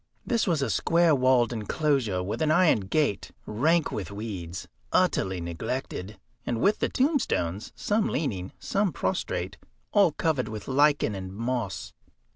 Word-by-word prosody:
This 230 -3 +1
was 160 -6 +1
a 120 - 0
square 170 -1 +3
walled 130 -3 +3
enclosure 115 -3 0
with 100 - -4
an 155 - +2
iron 160 -5 +4
gate, 100 +4 0 0.2
rank 155 +10 +1
with 100 -3 -4
weeds, 100 -4 -6 0.2
utterly 95 -1 +2
neglected, 100 +4 -4 0.3
and 115 - -2
with 205 - +3
the - - +1
tombstones, 240 - 0
some 210 +1 0
leaning, 100 - -2
some 200 -2 0
prostrate, 95 - -2 0.3
all 195 -5 +5
covered 150 -5 0
with 110 -1 -7
lichen 145 -3 +3
and 95 -1 -6
moss. 115 -2 -3
125 Hz, 140 wpm, -27 LUFS, 100-155 Hz, 0.3 s, all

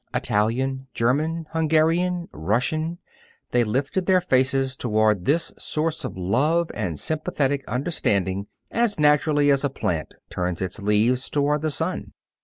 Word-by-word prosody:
Italian, 130 +6 +1
German, 155 +8 0
Hungarian, 165 +2 +1
Russian 125 - -1 0.5
they 120 -1 +3
lifted 135 - -1
their 185 -1 +5
faces 130 -4 +1
toward 110 -6 +1
this 165 +4 +1
source 160 +1 -2
of 130 - -5
love 145 - +1
and 90 -9 -3
sympathetic 145 -3 -1
understanding 100 - -1 0.2
as 230 -6 +1
naturally 150 -1 +4
as 140 0 +2
a 140 - +1
plant 85 - -3 0.2
turns 90 -1 -2
its 95 +2 -4
leaves 110 +5 +1
toward 145 0 +1
the 155 - 0
sun. 160 +4 -3
135 Hz, 130 wpm, -24 LUFS, 110-160 Hz, 0.5 s, their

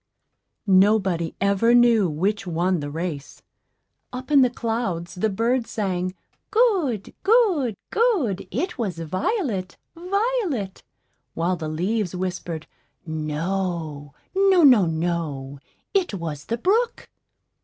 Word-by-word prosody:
Nobody 190 -4 +3
ever 200 +4 +3
knew 235 -6 +5
which 195 +7 -1
won 175 +1 0
the 145 -1 -4
race. 155 -2 -5 0.7
Up 255 +3 -7
in 285 -2 +7
the 250 - +4
clouds 225 -8 -3
the 195 +4 0
birds 230 +4 0
sang, 185 -3 -2 0.3
"Good, 375 - +1
good, 380 - +3 0.2
good; 385 - +1
it 360 -5 -3
was 195 -7 -2
Violet, 190 - -2 0.2
Violet!" 365 - -1 0.5
while 175 +3 0
the 155 -3 -5
leaves 185 +4 -1
whispered, 180 -3 -4 0.4
"No, 155 -1 -3 0.2
no, 385 -3 +5
no, 245 - +7
no; 160 -5 -3 0.3
it 370 - +1
was 155 -5 -5
the 230 - -2
brook!" 450 - 0
195 Hz, 110 wpm, -23 LUFS, 170-255 Hz, 0.7 s, in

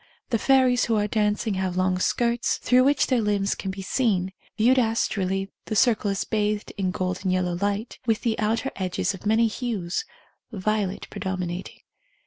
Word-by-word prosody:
The 230 - +2
fairies 255 0 +4
who 230 - +1
are 210 -1 +2
dancing 210 0 0
have 185 -1 -2
long 185 0 +1
skirts, 235 +4 +1
through 255 +1 +3
which 285 +1 +3
their 255 -3 +1
limbs 205 -2 +1
can 195 - -5
be 190 0 -5
seen; 190 -4 0 0.2
viewed 250 +4 +4
astrally 195 -4 0
the 215 - -3
circle 215 -2 +3
is 195 -1 -1
bathed 210 -1 -1
in 190 -2 -1
golden 185 +1 -2
yellow 185 -1 +1
light, 205 +5 -2
with 225 -1 +2
the 225 -2 -1
outer 225 +5 0
edges 185 +1 -1
of 190 +2 -7
many 220 +2 +4
hues, 220 - -2 0.5
violet 205 -1 -1
predominating. 185 -1 -4
210 Hz, 165 wpm, -25 LUFS, 190-230 Hz, 0.5 s, fairies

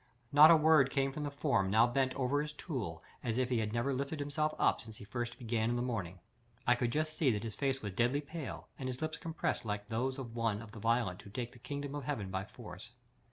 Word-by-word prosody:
Not 150 +2 +9
a 170 - +9
word 155 -3 +5
came 135 0 +1
from 150 - -5
the 145 - -1
form 140 -9 +1
now 110 +4 +6
bent 130 +1 +1
over 140 +2 +1
his 150 0 -4
tool 125 - -4 0.2
as 115 0 -1
if 130 -1 +1
he 125 -3 +2
had 110 -1 -1
never 120 +4 0
lifted 140 +3 -2
himself 145 +2 0
up - - +3
since 110 -3 -10
he - - -10
first 120 +2 -4
began 115 -2 0
in 120 - +1
the 120 - 0
morning. 100 -8 -3 0.5
I 120 - +6
could 120 -1 0
just 155 +2 -1
see 150 -4 +3
that 105 -4 0
his 115 -2 -4
face 135 0 -1
was 100 -2 -3
deadly 120 +7 +2
pale, 150 -1 -6
and 130 -1 -2
his 125 0 -4
lips 155 +1 -2
compressed 165 -1 -2
like 105 -2 -3
those 130 +4 -1
of 120 -4 -7
one 115 -3 0
of 110 -1 -10
the 115 - -9
violent 115 -4 +1
who - - -12
take 120 +3 -4
the 125 - -16
kingdom 140 +3 -5
of 145 -3 -4
heaven 110 -10 -2
by 95 +1 -2
force. - - -10
125 Hz, 250 wpm, -34 LUFS, 115-145 Hz, 0.5 s, Not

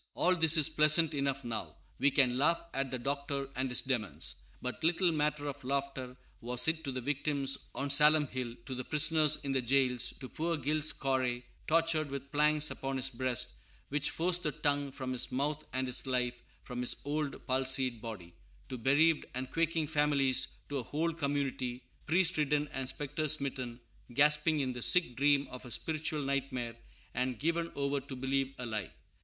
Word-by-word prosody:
] - - -44
All 185 +1 +3
this 165 -1 +5
is 155 - +6
pleasant 155 +1 +5
enough 140 -1 -1
now; 115 -2 -5 0.2
we 140 - +5
can 130 -3 +3
laugh 160 +6 +3
at 135 0 -1
the 130 - -3
Doctor 140 +2 -2
and 130 +1 -1
his 125 - +2
demons; 120 - -2 0.2
but 125 +5 -5
little 175 +2 +3
matter 150 -1 0
of 140 -2 -6
laughter 135 -1 -3 0.2
was 125 +2 0
it 160 0 +1
to 135 - -2
the 130 0 -4
victims 140 0 -1
on 140 0 -1
Salem 150 +1 +6
Hill; 125 -3 -5
to 130 - -4
the 130 0 -3
prisoners 150 +1 +5
in 140 - -1
the 135 -1 +1
jails; 125 0 +2
to 130 - -7
poor 165 +5 -2
Giles 150 +2 +2
Corey, 130 -2 -1 0.2
tortured 160 -2 +2
with 140 0 -7
planks 150 0 +3
upon 135 0 -4
his 130 0 +1
breast, 125 0 0 0.4
which 145 +1 0
forced 175 +1 +1
the 150 - -1
tongue 145 -1 0
from 130 -1 -5
his 125 - +1
mouth 145 +3 -1
and 130 0 -1
his 125 +1 0
life 125 -1 -1 0.2
from 125 0 -7
his 125 - +2
old, 145 0 -3
palsied 130 -2 0
body; 95 -7 -8 0.4
to 130 - -5
bereaved 150 +6 +3
and 130 +1 -3
quaking 165 -1 0
families; 145 -4 +2 0.2
to 145 -1 -2
a - - -4
whole 160 +7 -2
community, 140 -4 -2 0.2
priest 175 +1 +2
ridden 150 0 +1
and 135 -1 -3
spectresmitten, 140 -4 -2 0.4
gasping 150 +1 +4
in 130 -2 -2
the 120 - -6
sick 170 -3 +3
dream 140 +1 +3
of 125 - -8
a 125 - -10
spiritual 155 +2 -2
nightmare 130 -4 -2 0.4
and 125 0 -1
given 165 +4 -1
over 140 0 0
to 135 0 -8
believe 135 +1 -1
a 125 - -5
lie. 110 -6 -3
140 Hz, 185 wpm, -32 LUFS, 130-150 Hz, 0.4 s, is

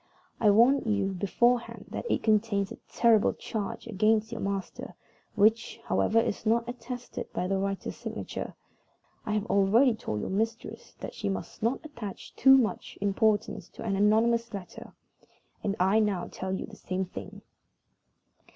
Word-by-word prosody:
"I 215 - +5
warn 240 +7 +6
you 205 -5 0
beforehand 235 +6 +1
that 475 - -4
it - - 0
contains 210 -2 +2
a - - -7
terrible 230 -3 +4
charge 210 -3 -5
against 220 +1 +1
your 230 - -5
master, 195 -1 -4 0.4
which, 220 +3 +2
however, 225 - +2
is 225 - -1
not 230 +1 +2
attested 245 0 -6
by - - -1
the 195 +1 0
writer's 195 0 -3
signature. - - -6 0.7
I 210 - 0
have 210 -1 0
already 225 +6 +4
told 105 - -4
your - - -4
mistress 225 +4 -3
that - - -6
she 205 - -3
must 195 - -5
not 235 +7 0
attach 235 -10 -8
too 265 +1 +7
much 220 -8 -1
importance 205 -1 +1
to - - -10
an 205 -3 -1
anonymous 230 +3 +3
letter; 185 -3 -9 0.7
and 200 -1 0
I 190 +4 +4
now 205 -5 0
tell 190 0 -4
you 190 - -2
the - - -13
same 185 +1 -3
thing." 180 - -9
215 Hz, 155 wpm, -28 LUFS, 195-230 Hz, 0.7 s, too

